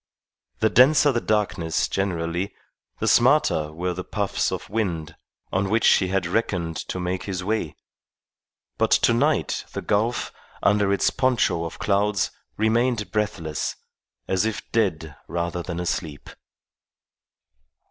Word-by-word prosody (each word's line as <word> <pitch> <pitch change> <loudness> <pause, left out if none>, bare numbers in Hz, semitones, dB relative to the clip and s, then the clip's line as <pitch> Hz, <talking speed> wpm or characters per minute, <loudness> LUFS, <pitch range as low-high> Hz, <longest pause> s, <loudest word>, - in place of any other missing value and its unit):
The 110 - +4
denser 145 +5 +6
the 120 -2 -1
darkness 95 -7 0
generally, 90 0 -2 0.4
the - - -2
smarter 75 -1 +3
were 90 +3 -2
the 90 +1 -5
puffs 100 0 -1
of - - -5
wind 90 -8 -2 0.4
on 95 +1 +1
which 110 +2 +3
he 95 - +5
had 95 -1 0
reckoned 85 -4 -1
to 90 - -4
make 90 +1 -3
his 95 -2 -3
way; 100 -7 -2 1.0
but - - +2
tonight 140 +6 +2
the - - -3
gulf, 115 +4 0 0.3
under 100 -1 +3
its 100 - +2
poncho 125 -10 +1
of 85 - -7
clouds, 100 -2 +1 0.3
remained 115 0 +1
breathless, 85 -8 -2 0.5
as 95 0 +1
if 110 -1 -3
dead 80 -9 0
rather 85 0 -2
than 85 0 -5
asleep. 80 -4 -4
95 Hz, 125 wpm, -24 LUFS, 85-110 Hz, 1.0 s, denser